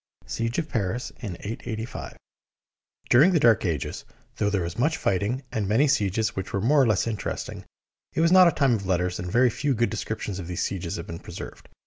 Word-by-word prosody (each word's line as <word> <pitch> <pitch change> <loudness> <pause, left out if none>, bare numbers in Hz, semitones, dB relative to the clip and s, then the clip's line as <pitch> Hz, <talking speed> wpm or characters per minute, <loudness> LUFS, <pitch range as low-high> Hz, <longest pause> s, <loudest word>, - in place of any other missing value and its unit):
SIEGE 115 0 -2
OF 165 - -1
PARIS 115 +1 -2
IN 105 -7 -5
885 110 +1 -6 0.9
DURING 150 +10 +6
the 165 - +4
Dark 115 -5 +4
Ages, 80 -7 -2 0.3
though 105 - +1
there 100 -3 0
was 85 +5 -5
much 155 +5 0
righting 105 +8 0
and 105 -3 -1
many 115 +9 +3
sieges 110 -2 +1
which 95 -1 -5
were 100 - +1
more 140 +8 +4
or 130 - +4
less 105 -4 +2
interesting, 110 -3 -4 0.5
it - - 0
was 165 +1 +4
not 185 -1 +8
a - - +5
time 140 -4 +2
of 100 -4 -2
letters, 90 -1 0
and 90 0 -4
very 120 +2 +4
few 140 +3 0
good 120 +1 +1
descriptions 105 -3 -4
of 85 - -6
these 90 -1 -2
sieges 90 -3 -3
have 85 - -5
been 85 0 -7
preserved. - - -9
110 Hz, 205 wpm, -25 LUFS, 95-130 Hz, 0.9 s, not